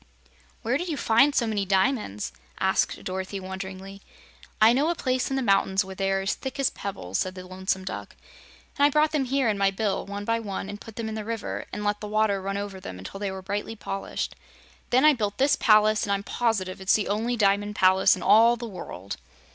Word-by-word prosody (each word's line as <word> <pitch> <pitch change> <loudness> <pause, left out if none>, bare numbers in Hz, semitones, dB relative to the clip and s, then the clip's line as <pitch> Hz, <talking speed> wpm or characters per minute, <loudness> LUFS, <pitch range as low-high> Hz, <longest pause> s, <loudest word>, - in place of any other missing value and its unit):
"Where 245 +4 +1
did 355 - -3
you 315 -4 -2
find 270 +6 +4
so 235 - +3
many 215 -3 -1
diamonds?" 190 - 0 0.3
asked 190 0 +1
Dorothy, 190 +1 -4
wonderingly. 190 +1 -7 0.6
"I 220 +2 +7
know 285 +6 +2
a 345 - 0
place 255 -4 -1
in 270 - -1
the 265 - 0
mountains 195 -2 +2
where 190 - -7
they 195 0 -1
are 195 0 0
thick 265 +7 -3
as 275 - +2
pebbles," 95 - -4
said 185 0 -2
the 185 -1 -8
Lonesome 190 +1 -3
Duck, 190 - -6 0.6
"and - - +4
I 290 - +7
brought 300 +1 +3
them 295 -4 0
here 265 0 +1
in 210 -2 0
my 195 0 +4
bill, 200 0 -2
one 200 +1 -5
by 230 +1 +1
one 200 -3 -5
and 205 0 -7
put 225 - -11
them 230 -1 -4
in 220 - -4
the 215 -1 -4
river 230 +1 -4
and 210 - -5
let 205 0 -1
the 210 - -5
water 210 -2 +1
run 195 +1 -3
over 200 -1 -5
them 95 - -8
until 95 - -8
they 200 -1 -2
were 190 0 -7
brightly 205 +3 -3
polished. 195 -2 -4 0.5
Then 255 +4 +4
I 305 - +8
built 210 -5 -2
this 275 +2 +4
palace, 215 -1 +4
and 200 - -1
I'm 200 0 0
positive 200 -6 -1
it's 190 - +3
the 210 - 0
only 225 +4 -1
Diamond 205 0 +2
Palace 190 0 +5
in - - -7
all 230 +2 +6
the 240 0 -6
world." 100 - -7
205 Hz, 225 wpm, -26 LUFS, 190-230 Hz, 0.6 s, I